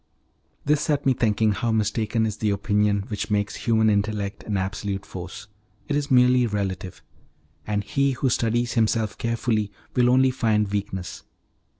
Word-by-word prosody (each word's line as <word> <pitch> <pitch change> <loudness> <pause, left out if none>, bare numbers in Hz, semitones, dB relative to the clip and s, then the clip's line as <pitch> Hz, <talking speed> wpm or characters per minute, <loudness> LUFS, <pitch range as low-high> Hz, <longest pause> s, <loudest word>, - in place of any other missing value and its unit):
This 150 0 +2
set 150 -2 0
me 135 - +4
thinking 110 -2 +2
how 115 +3 -1
mistaken 110 +1 0
is 105 -2 -3
the 110 - 0
opinion 105 0 +1
which 105 -2 -3
makes 105 -1 0
human 110 -1 +4
intellect 105 -1 0
an 105 -2 -1
absolute 95 +1 -3
force; 90 +3 -8 0.4
it 145 - -1
is 145 0 -1
merely 125 -1 +5
relative, 95 -3 -4 0.6
and 105 -1 -1
he 140 +7 +1
who 130 +2 -1
studies 120 +1 0
himself 110 -2 +1
carefully 115 -3 -1 0.2
will 125 - +4 0.3
find 110 -4 +1
only 100 - -8
weakness. 95 -3 -4
110 Hz, 155 wpm, -24 LUFS, 100-120 Hz, 0.6 s, merely